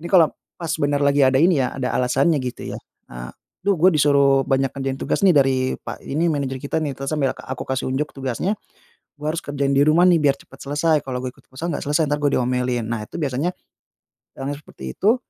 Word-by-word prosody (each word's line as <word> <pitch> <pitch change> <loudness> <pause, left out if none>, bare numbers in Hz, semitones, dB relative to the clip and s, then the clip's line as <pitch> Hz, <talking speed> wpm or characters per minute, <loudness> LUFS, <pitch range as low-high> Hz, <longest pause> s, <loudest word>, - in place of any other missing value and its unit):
ini 170 - -7
kalo 160 -8 +6 0.3
pas 165 -2 -2
bener 145 0 +1
lagi 140 0 +3
ada 130 0 +4
ini 170 -3 +4
ya, 125 - -2
ada 130 -1 -2
alasannya, 135 +5 +2
gitu, 125 - -5
ya, - - -7 0.3
eee, - - -7 0.4
"Duh, 200 - +4
gue 180 +4 +6
disuruh 140 -2 +4
banyak 135 -1 +1
ngerjain 135 -1 -3
tugas - - -1
nih 180 - +6
dari 135 -1 +4 0.2
Pak - - -7
ini, 160 +5 0
manajer 135 -3 -2
kita 140 - -1
nih." 140 -3 -2
Terus 135 +1 -3
sambil 140 -4 +1
ke - - -11
aku 130 -1 -4
kasih 130 -1 -1
unjuk 145 +3 -1
tugasnya, 135 - -2 0.7
"Gua 150 +1 -1
harus 170 - -3
kerjain 140 -1 -1
di 140 - +5
rumah 160 +3 +5
nih, 180 - +6
biar 140 -1 +4
cepat 135 - -17
selesai. 150 +3 +1
Kalo 125 -1 -3
gue - - -2
ikut - - -23
futsal, 145 +6 -5
nggak - - -3
selesai, 150 +1 +1
entar 145 - +2
gue 145 - +3
diomelin." 125 -1 0
Nah, 115 -2 -3
itu - - -9
biasanya 145 +4 -1 0.9
yang 135 +1 -3
seperti 65 - -9
itu 215 +5 +4
140 Hz, 225 wpm, -22 LUFS, 130-155 Hz, 0.9 s, kalo